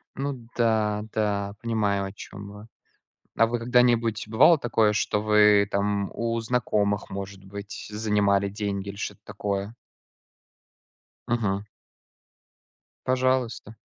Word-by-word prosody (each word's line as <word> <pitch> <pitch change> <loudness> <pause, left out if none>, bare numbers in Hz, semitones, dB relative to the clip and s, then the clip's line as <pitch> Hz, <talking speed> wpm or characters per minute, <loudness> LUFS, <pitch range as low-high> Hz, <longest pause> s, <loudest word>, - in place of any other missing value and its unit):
Ну 135 -4 -4
да, 110 -3 +1
да, 100 -2 -1
понимаю, 105 -4 0
о 95 - -6
чём 100 0 -10
вы. 105 +2 -12 0.7
А 115 - +4
вы 120 +1 -2
когда-нибудь, 120 -2 +2
бывало 120 +10 +6
такое, 115 -5 +2
что 105 0 0
вы 105 -1 +5
там 100 0 0
у 115 0 -1
знакомых, 105 -4 0
может 100 0 -7
быть, 100 +1 -8
занимали 105 -2 +1
деньги 100 -1 -3
или 100 - -7
что-то 105 +1 -6
такое? 100 +1 -4 1.5
Мгм. 105 -4 -1 1.4
Пожалуйста. 130 -4 0
105 Hz, 110 wpm, -26 LUFS, 100-115 Hz, 1.5 s, бывало